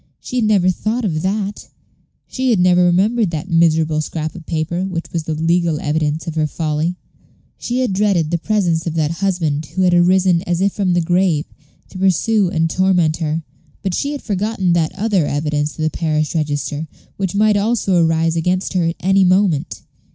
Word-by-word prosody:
She 255 - -5
had 235 - +2
never 195 -4 +3
thought 220 +6 -2
of 155 -5 -1
that; 200 +2 -3 0.6
she 260 -1 -2
had 225 -6 +3
never 180 0 +4
remembered 200 +5 +2
that 165 +3 -5
miserable 160 -2 +2
scrap 155 0 -4
of 170 -3 -12
paper 165 +2 -2
which 180 -3 -5
was 165 -2 -2
the 160 - -2
legal 165 0 +1
evidence 150 0 -1
of 165 - -4
her 155 -1 0
folly. 155 +2 -2 0.6
She 245 +2 -2
had 250 -6 0
dreaded 185 -5 +1
the 170 - 0
presence 175 -5 0
of 165 - -3
that 155 -1 0
husband 165 -5 -1
who 185 - -2
had 180 -1 +3
arisen, 180 0 +3
as 175 -1 0
if 195 +1 +1
from 190 -3 0
the 175 - +2
grave, 175 -2 +1 0.4
to 185 - -9
pursue 195 +2 +2
and 165 -3 +1
torment 175 -3 +1
her, 160 0 -2 0.4
but 190 -2 -1
she 280 +10 -1
had 285 - -7
forgotten 195 -3 -1
that 165 -2 +1
other 195 -6 +1
evidence 150 0 -2
of 155 - -3
the 155 - 0
parish 155 -2 -1
register, 150 -1 -2 0.3
which 190 -1 -2
might 210 +1 +3
also 200 -4 +1
arise 165 0 +1
against 180 +4 -1
her 180 -3 +1
at 165 +1 -1
any 195 +2 +3
moment. 185 -5 +1
175 Hz, 190 wpm, -18 LUFS, 160-195 Hz, 0.6 s, never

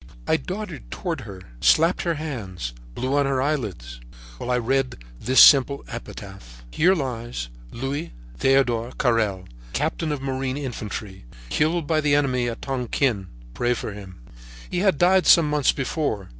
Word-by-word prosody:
"I - - +4
darted 185 -3 -5
toward 170 -7 -4
her, 100 -5 -9 0.2
slapped 165 - +4
her 170 -2 0
hands, 100 - -5 0.2
blew 130 +3 -1
on 140 -1 +3
her 135 -1 0
eyelids, 100 - -3 0.4
while - - -5
I 125 - +2
read 130 +2 0 0.2
this 130 - +3
simple 140 0 +7
epitaph: 95 - -9
'Here 180 - +4
lies 120 - -4 0.2
Louis 140 +6 -4 0.3
Theodore 125 -3 +2
Carrel, 110 -7 +1 0.3
Captain 160 -2 -1
of 145 - -2
Marine 135 0 -2
Infantry, 105 - -6 0.2
killed 160 - +1
by 155 +1 +1
the 145 -1 +3
enemy 130 -4 +1
at 115 - -7
Tonquin. 125 -5 -1 0.3
Pray 120 - +1
for 105 - -5
him.' 95 -3 -11 0.5
"He 175 - 0
had 190 -5 +3
died 185 +3 +4
some 165 -3 +7
months 150 -2 +3
before. 135 - -2
130 Hz, 150 wpm, -24 LUFS, 110-150 Hz, 0.5 s, simple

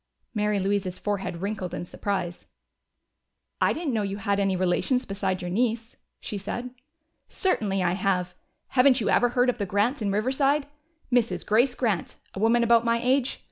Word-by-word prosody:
Mary 210 -2 +1
Louise's 190 -1 -1
forehead 195 -4 -3
wrinkled 195 -4 -3
in - - -5
surprise. 185 -2 -4 1.1
"I - - +4
didn't 315 -5 -2
know 220 - +1
you 200 -1 -3
had 200 0 0
any 195 -1 +1
relations 185 +8 +1
besides 190 -2 -2
your 175 - -4
niece," 230 +2 -1 0.2
she 205 - -5
said. 240 +5 -5 0.6
"Certainly 205 - 0
I 175 - +2
have. 180 -1 0 0.4
Haven't 255 0 +5
you 220 - 0
ever 245 - +4
heard 245 +1 +2
of 250 -1 0
the 200 - -1
Grants 210 +8 +1
in 200 -2 0
Riverside? 270 +7 +1 0.5
Mrs. 225 -8 +1
Grace 245 +4 +3
Grant 215 -9 -1 0.2
a - - -6
woman 230 +3 +3
about 235 0 +5
my 235 0 +2
age? 255 +2 +1
210 Hz, 170 wpm, -26 LUFS, 195-245 Hz, 1.1 s, Haven't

